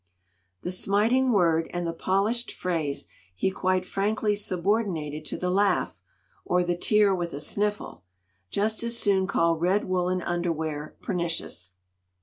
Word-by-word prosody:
"The 180 - -2
smiting 220 +8 +3
word 165 -6 +3
and 175 0 -2
the 165 - -2
polished 200 +8 0
phrase 160 -6 -2 0.3
he 190 - 0
quite 185 -1 0
frankly 210 +2 0
subordinated 180 -6 -1
to - - -4
the 180 0 -1
laugh, 195 0 +1 0.4
or 180 0 +2
the 175 0 0
tear 205 +2 +4
with 175 -2 -2
a - - -5
sniffle. 205 - -1 0.5
Just 215 - 0
as 235 0 -1
soon 195 -4 +2
call 170 -3 +2
red 185 +5 +2
woolen 185 -1 0
underwear 160 -3 -2
pernicious! 165 - -3
185 Hz, 135 wpm, -27 LUFS, 170-205 Hz, 0.5 s, tear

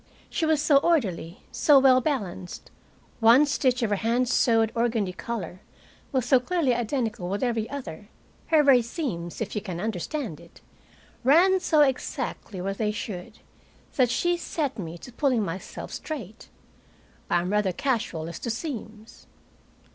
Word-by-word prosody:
She 320 - 0
was 315 -2 +3
so 295 -1 +4
orderly, 205 - 0
so 295 -2 +5
well 260 -1 +6
balanced, 200 - -4 0.5
one 235 +5 +6
stitch 255 -3 +1
of 215 - 0
her 205 - +2
hand 235 +4 +1
sewed 225 -3 +3
organdy 230 -5 0
collar 185 -4 -5 0.5
was 260 -4 0
so 260 0 +5
clearly 280 0 +1
identical 230 -6 -2
with 200 +6 -2
every 230 -3 -1
other, 220 - -7 0.4
her 315 -2 +4
very 270 -3 +6
seams, 225 - -5
if 220 - -3
you 210 - -1
can 185 -5 -5
understand 220 - -3
it, - - -17 0.6
ran 350 +9 +5
so 315 -4 +3
exactly 260 -7 -1
where 195 +2 -2
they 210 +1 -1
should, 195 -4 -7 0.5
that 255 -3 +3
she 350 +8 +1
set 295 -7 -3
me 170 -2 -6
to 250 - -12
pulling 250 -3 +1
myself 185 +2 -6
straight. 230 - -7 0.8
I 175 - +3
am 180 +2 -3
rather 210 -2 +2
casual 220 - -2
as 170 - -7
to 235 - -4
seams. 225 -4 -7
235 Hz, 155 wpm, -26 LUFS, 200-275 Hz, 0.8 s, well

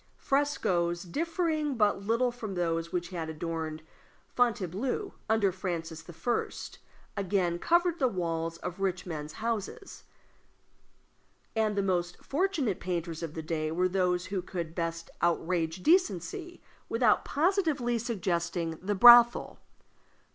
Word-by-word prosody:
Frescoes 180 - 0
differing 310 - -1
but 210 -3 +2
little 230 +4 +1
from 220 -5 -6
those 165 -1 -1
which 175 -1 -2
had 165 -4 -4
adorned 160 -1 -4 0.5
Fontainebleau 245 - 0 0.2
under 220 -3 +3
Francis 165 -3 -4
I. 175 +8 -1 0.7
again 180 -3 0
covered 345 - +2
the 265 - +4
walls 165 -5 -2
of 180 +2 -6
rich 185 -2 -1
men's 155 -3 -5
houses; 230 - -4 1.5
and 215 -1 +1
the 200 - +1
most 175 -2 -1
fortunate 295 - -1
painters 170 -2 -3
of 165 -2 -5
the 160 - -4
day 155 -1 -2
were 180 +3 +2
those 180 -1 +1
who 190 -1 -2
could 170 -3 -5
best 165 -1 -3
outrage 170 0 0
decency 350 - +1 0.3
without 230 -2 +3
positively 300 - +1
suggesting 175 -7 -2
the 205 +3 -1
brothel. 240 +3 +7
185 Hz, 120 wpm, -29 LUFS, 170-240 Hz, 1.5 s, brothel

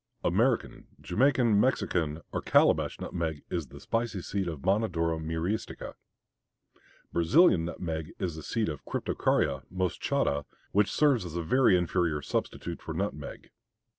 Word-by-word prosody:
American, - - +1
Jamaica, 135 -1 +2
Mexican, 90 - +1
or - - -1
Calabash - - +3
nutmeg 80 -4 -3
is 85 -5 -2
the - - -12
spicy 115 -4 -2
seed 95 -2 -2
of 80 -5 -5
Monodora 90 -5 +1
Myristica. 80 +7 -3 1.2
Brazilian 85 - +5
nutmeg 80 -2 -4
is 85 -4 -3
the 80 - -7
seed 110 +7 -1
of 75 -4 -5
Cryptocarya 70 -1 0
moschata, 90 -5 0 0.3
which 105 +1 +3
serves 140 -8 +3
as 85 -2 -7
a 85 - -1
very 120 +1 +4
inferior 85 -4 0
substitute - - -3
for - - -6
nutmeg. - - -5
90 Hz, 130 wpm, -29 LUFS, 80-105 Hz, 1.2 s, Brazilian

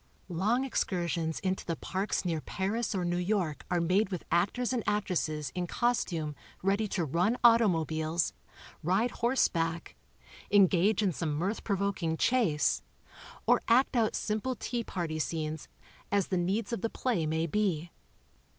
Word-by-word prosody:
Long 210 +9 +1
excursions 170 - -1
into 190 -1 -1
the 165 - -2
parks 190 +3 -2
near 165 -3 -1
Paris 205 +6 -2
or 180 -2 -1
New 175 0 0
York 180 -5 -1
are 180 - +2
made 185 +4 +2
with 180 -4 -4
actors 200 +9 +1
and 240 -3 -1
actresses 165 -7 -1
in 180 -1 -2
costume 170 -10 0 0.3
ready 200 +3 +2
to 180 -4 -1
run 175 - +1
auto 230 -1 +7
mobiles, 160 -1 0 0.5
ride 190 +9 +1
horseback, 170 -9 0 0.5
engage 200 +1 +4
in 195 - +2
some 155 -2 -2
mirth 190 +8 -2
provoking 195 -5 -1
chase 210 -13 +2 0.6
or - - +4
act 255 +3 +4
out 225 -3 +2
simple 220 +4 -1
tea 240 +1 -3
party 170 -6 -3
scenes, 155 -1 -3 0.4
as 200 -2 +1
the 190 - 0
needs 200 +5 -1
of 230 - -2
the 230 - 0
play 220 -13 -1
may 160 +1 0
be. 175 -2 -1
185 Hz, 150 wpm, -30 LUFS, 165-215 Hz, 0.6 s, auto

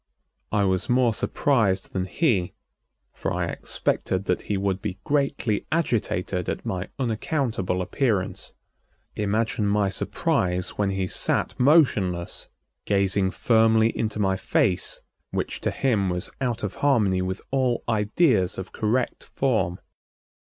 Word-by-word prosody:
I 105 - +2
was 95 -1 +1
more 125 -2 +3
surprised 105 -5 +1
than 95 -1 -1
he, 100 - 0 0.6
for - - -3
I - - 0
expected 95 +1 -1
that 90 - 0
he 105 - +1
would 95 -1 -1
be 95 - -4
greatly 140 -7 0
agitated 100 - 0
at - - -4
my 90 0 -3
unaccountable 115 - -1
appearance. 105 -3 -1 0.6
Imagine 105 +1 0
my 100 -1 +2
surprise 90 -1 0
when 100 -1 -1
he 95 -1 -1
sat - - +1
motionless, 110 - +2 0.4
gazing 100 -1 +2
firmly 110 +1 +3
into 110 -1 -2
my 95 -2 +1
face 95 -1 0 0.3
which - - -3
to - - 0
him 110 -8 +1
was 90 0 -3
out 120 -4 -1
of 100 - -2
harmony 105 -10 +3
with 95 +1 -2
all 130 -3 +1
ideas 105 - +2
of 95 0 -6
correct 120 +4 -1
form. 110 -10 0
105 Hz, 130 wpm, -25 LUFS, 95-120 Hz, 0.6 s, more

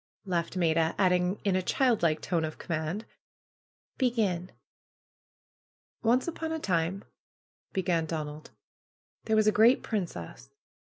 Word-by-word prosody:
laughed 175 -1 -2
Maida; 165 -2 +2
adding 180 0 +2
in 195 -2 +2
a 185 - +2
child 245 +4 +2
like 155 -2 +2
tone 170 -3 0
of 155 -1 -4
command, 165 +6 -3 0.9
^^Begin!" 210 -9 +1 1.5
^^Once 240 +5 +3
upon 325 -1 -3
a 320 - -1
time," 180 - -1 0.7
began 170 -4 0
Donald, 155 -1 -5 0.8
^Hhere 220 - +3
was 215 -1 +4
a 215 - +5
great 230 +5 +5
princess. 165 - -4
180 Hz, 120 wpm, -29 LUFS, 165-215 Hz, 1.5 s, a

